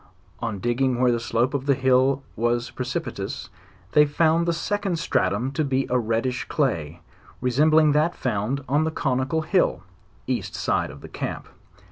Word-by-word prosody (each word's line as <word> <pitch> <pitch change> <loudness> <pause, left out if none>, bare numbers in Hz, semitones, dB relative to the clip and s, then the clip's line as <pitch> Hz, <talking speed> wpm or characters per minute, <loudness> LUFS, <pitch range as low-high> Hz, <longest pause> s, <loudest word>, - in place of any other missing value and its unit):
On 115 -4 -3
digging 120 +4 0
where 125 -1 +4
the 120 - 0
slope 120 +3 0
of 140 -1 -2
the 140 - +4
hill 130 +1 +3
was 120 +1 0
precipitous, 130 -6 -4 0.4
they 150 - +6
found 165 +3 +2
the - - +3
second 195 +2 -1
stratum 120 - 0
to 155 +3 -1
be 135 -1 0
a 125 - +3
reddish 115 +3 -1
day, 85 - -1 0.4
resembling 150 +5 +4
that 155 +4 +2
found 125 +3 -2
on 145 +4 +2
the 160 - 0
conical 135 +1 -1
hill, 180 - +1 0.4
east 120 -7 -3
side - - 0
of 70 +1 -11
the - - -9
camp. - - -5
130 Hz, 160 wpm, -24 LUFS, 120-150 Hz, 0.4 s, they